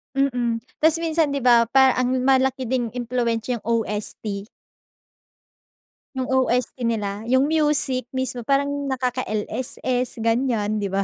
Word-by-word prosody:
Mm. 245 Hz, -4 st, 0 dB, 0.2 s
Tas 320 Hz, +1 st, +4 dB
minsan 320 Hz, -3 st, +1 dB
'di 275 Hz, -3 st, -2 dB
ba 235 Hz, -2 st, +5 dB
parang 265 Hz, +1 st, +4 dB
ang -, -, -1 dB
malaki 265 Hz, -1 st, +2 dB
ding 245 Hz, -1 st, 0 dB
impluwensiya 240 Hz, -1 st, -1 dB
yung -, -, -30 dB, 0.2 s
OST. 210 Hz, -1 st, -4 dB, 1.7 s
Yung 260 Hz, -1 st, -2 dB
OST 255 Hz, -1 st, +1 dB
nila, 210 Hz, -1 st, -2 dB
yung 260 Hz, +2 st, +3 dB
music 295 Hz, -5 st, +1 dB
mismo 260 Hz, -1 st, -1 dB
parang 280 Hz, +1 st, +2 dB, 0.2 s
nakaka-LSS 250 Hz, -1 st, -2 dB
ganyan, 225 Hz, -3 st, 0 dB
'di 200 Hz, -, -1 dB
ba? 195 Hz, +1 st, -1 dB
250 Hz, 125 wpm, -23 LUFS, 230-265 Hz, 1.7 s, ba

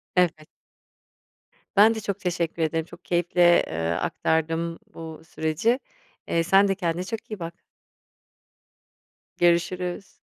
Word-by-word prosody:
Evet. 165 Hz, -4 st, +2 dB, 1.3 s
Ben 215 Hz, +3 st, +6 dB
de -, -, -3 dB
çok 200 Hz, -2 st, -3 dB
teşekkür 170 Hz, -3 st, -2 dB
ederim. 160 Hz, 0 st, 0 dB
Çok 175 Hz, +1 st, -15 dB
keyifle, 175 Hz, 0 st, +4 dB
ııı, 80 Hz, +1 st, -1 dB
aktardım 165 Hz, +1 st, -1 dB
bu 160 Hz, -1 st, -8 dB
süreci. 165 Hz, -, 0 dB, 0.5 s
Eee, 165 Hz, -, +1 dB
sen 195 Hz, +4 st, +5 dB
de 195 Hz, -, +1 dB
kendine 175 Hz, -2 st, -1 dB
çok 220 Hz, +3 st, -6 dB
iyi 215 Hz, -, -5 dB
bak. 170 Hz, 0 st, -5 dB, 1.8 s
Görüşürüz. 175 Hz, +2 st, +1 dB
175 Hz, 115 wpm, -25 LUFS, 165-185 Hz, 1.8 s, Ben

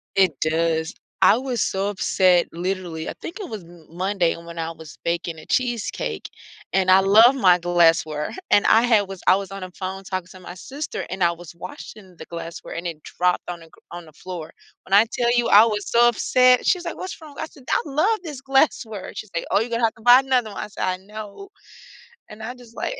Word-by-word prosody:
It 190 Hz, -6 st, +2 dB
does, 160 Hz, +2 st, 0 dB, 0.3 s
I 215 Hz, -, +6 dB
was 255 Hz, -2 st, -1 dB
so 195 Hz, +1 st, -1 dB
upset, 185 Hz, -3 st, +2 dB
literally 175 Hz, -2 st, -4 dB
I -, -, -5 dB
think 355 Hz, +6 st, -8 dB
it 380 Hz, -, -6 dB
was 210 Hz, -4 st, -7 dB
M 170 Hz, -1 st, -16 dB
Monday 185 Hz, 0 st, 0 dB
when 170 Hz, 0 st, -10 dB
I 165 Hz, 0 st, -2 dB
was 160 Hz, -3 st, -12 dB
baking 170 Hz, -1 st, -2 dB
a -, -, -13 dB
cheesecake, 240 Hz, -3 st, -2 dB, 0.4 s
and 185 Hz, -1 st, +2 dB
I 190 Hz, -, +8 dB
love 215 Hz, +6 st, +6 dB
my 185 Hz, -10 st, +4 dB
glassware, 165 Hz, -3 st, +2 dB, 0.2 s
and 205 Hz, -, +5 dB
I 225 Hz, -, +6 dB
had 220 Hz, -5 st, +3 dB
was 195 Hz, -1 st, -9 dB
I 185 Hz, -, +6 dB
was 195 Hz, -1 st, -6 dB
on 195 Hz, 0 st, -7 dB
the 185 Hz, 0 st, -7 dB
phone 190 Hz, +1 st, -6 dB
talking 185 Hz, -2 st, -4 dB
to 185 Hz, -, -14 dB
my 180 Hz, -, -9 dB
sister, 275 Hz, -, -6 dB
and 185 Hz, 0 st, -2 dB
I 170 Hz, -, +4 dB
was 170 Hz, -1 st, -11 dB
washing 185 Hz, +2 st, -11 dB
the -, -, -10 dB
glassware, 170 Hz, 0 st, -8 dB
it 170 Hz, -2 st, -5 dB
dropped 180 Hz, 0 st, -1 dB
on 175 Hz, -1 st, -6 dB
the 165 Hz, -, -15 dB
gr -, -, -22 dB
on 175 Hz, 0 st, -8 dB
the 155 Hz, -, -17 dB
floor, 165 Hz, 0 st, -8 dB, 0.3 s
when 195 Hz, -, -6 dB
I 205 Hz, +3 st, +7 dB
tell 240 Hz, -1 st, +1 dB
you 240 Hz, -1 st, +2 dB
I 210 Hz, +2 st, +8 dB
was 210 Hz, -2 st, -2 dB
so 240 Hz, +1 st, +5 dB
upset, 250 Hz, +2 st, +3 dB
she's 360 Hz, -2 st, +2 dB
like, 340 Hz, -, -5 dB
"What's 370 Hz, -, -7 dB
wrong?" 305 Hz, -3 st, -13 dB
I -, -, -2 dB
said, 280 Hz, -, -18 dB
"I -, -, +3 dB
love 320 Hz, +10 st, +1 dB
this 295 Hz, -6 st, -7 dB
glassware," 270 Hz, -7 st, 0 dB
she's 215 Hz, -, -8 dB
like, 170 Hz, -, -2 dB
"Oh, -, -, +3 dB
you're 230 Hz, -, -3 dB
gonna 235 Hz, 0 st, -1 dB
have 225 Hz, 0 st, +2 dB
to 225 Hz, -, -18 dB
buy 245 Hz, +2 st, +8 dB
another 255 Hz, -5 st, 0 dB
one." -, -, -6 dB
I -, -, -7 dB
said, 210 Hz, -, -6 dB
"I 185 Hz, 0 st, 0 dB
know." 210 Hz, -, -10 dB, 0.8 s
And, 215 Hz, +1 st, -11 dB
I 235 Hz, +3 st, -5 dB
just, 245 Hz, -2 st, -17 dB
like -, -, -3 dB
195 Hz, 225 wpm, -22 LUFS, 175-235 Hz, 0.8 s, I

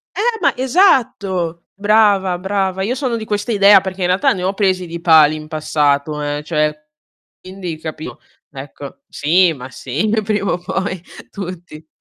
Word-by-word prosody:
Eh, 450 Hz, +1 st, 0 dB
ma -, -, +2 dB
esatto. 225 Hz, -, +1 dB
Brava, 200 Hz, -3 st, +2 dB
brava. 190 Hz, 0 st, -2 dB
Io 235 Hz, +5 st, -1 dB
sono 255 Hz, -3 st, -2 dB
di 220 Hz, -, -6 dB
questa 205 Hz, +2 st, -2 dB
idea, 200 Hz, -1 st, +6 dB
perché 190 Hz, 0 st, -6 dB
in 180 Hz, -, +1 dB
realtà 185 Hz, +2 st, +2 dB
ne 180 Hz, -1 st, -3 dB
ho 190 Hz, +2 st, 0 dB
presi 190 Hz, -3 st, 0 dB
di 170 Hz, 0 st, -7 dB
pali 155 Hz, -3 st, +5 dB
in 155 Hz, 0 st, -8 dB
passato, 150 Hz, -1 st, 0 dB
eh, 145 Hz, 0 st, -3 dB
cioè, 150 Hz, -1 st, 0 dB, 0.7 s
quindi 185 Hz, -4 st, -7 dB
capito, 155 Hz, -1 st, -8 dB, 0.3 s
ecco. 140 Hz, 0 st, -10 dB
Sì, 170 Hz, +4 st, +2 dB
ma 130 Hz, -3 st, -9 dB
sì, 140 Hz, -, -3 dB, 0.2 s
prima 205 Hz, -1 st, -1 dB
o -, -, -1 dB
poi 190 Hz, 0 st, -3 dB, 0.3 s
tutti. 175 Hz, -5 st, -9 dB
185 Hz, 160 wpm, -17 LUFS, 155-200 Hz, 0.7 s, idea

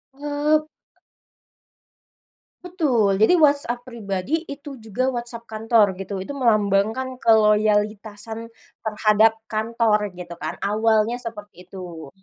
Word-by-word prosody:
Eee 295 Hz, +2 st, 0 dB, 2.0 s
Betul, 240 Hz, -, +1 dB
jadi 350 Hz, +11 st, +5 dB
WhatsApp 285 Hz, -6 st, +2 dB
pribadi, 230 Hz, -, -3 dB
itu 280 Hz, +1 st, -8 dB, 0.2 s
juga 220 Hz, +4 st, -2 dB
WhatsApp 235 Hz, -1 st, -5 dB
kantor 220 Hz, -2 st, +2 dB
gitu. 195 Hz, +1 st, -5 dB
Itu 190 Hz, +9 st, -6 dB
melambangkan 220 Hz, +4 st, +1 dB
keloyalitasan 215 Hz, 0 st, +1 dB, 0.3 s
terhadap 215 Hz, 0 st, +3 dB
kantor 220 Hz, -1 st, 0 dB
gitu 175 Hz, -1 st, -8 dB
kan, -, -, -4 dB
awalnya 220 Hz, +3 st, +1 dB
seperti 210 Hz, -5 st, -9 dB
itu. 175 Hz, -6 st, -9 dB
220 Hz, 100 wpm, -22 LUFS, 210-245 Hz, 2.0 s, jadi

